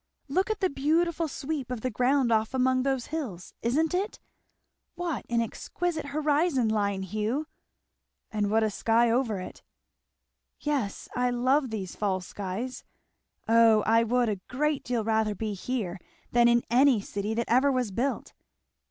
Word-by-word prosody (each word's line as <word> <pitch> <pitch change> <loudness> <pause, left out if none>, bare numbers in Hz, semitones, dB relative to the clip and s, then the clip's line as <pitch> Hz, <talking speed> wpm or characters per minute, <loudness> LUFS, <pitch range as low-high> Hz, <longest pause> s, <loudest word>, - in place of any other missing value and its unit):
Look 370 +9 0
at 435 -1 -2
the 375 - +3
beautiful 325 +4 +1
sweep 280 -2 -4
of 250 -3 -4
the 255 - -2
ground 250 +2 +2
off 220 +3 +1
among 255 0 +2
those 265 -2 0
hills 230 - -5
isn't 300 +8 +1
it? 390 +4 -2 0.8
What 345 -5 -3
an 235 -1 +2
exquisite 315 +6 -3
horizon 295 -3 +1
line, 200 -3 0
Hugh!" 215 - -2 0.9
"And 210 -2 0
what 220 +1 +3
a 215 - +1
sky 230 +3 +2
over 230 -5 +1
it!" 185 - -8 1.0
"Yes 275 -9 -2
I 250 0 +2
love 255 +3 +2
these 200 -5 -5
fall 195 -3 0
skies. 200 +7 -5 0.6
Oh 225 -1 +5
I 225 +1 +4
would 245 +1 +2
a 205 -4 -2
great 295 +3 0
deal 240 -3 -1
rather 220 -1 +1
be 215 +1 -3
here 200 -3 -3 0.3
than 240 0 +5
in 235 0 +4
any 255 -1 +5
city 205 +2 -3
that 235 - 0
ever 260 +4 +4
was 250 -5 0
built!" 255 +8 -2
240 Hz, 155 wpm, -28 LUFS, 220-280 Hz, 1.0 s, Oh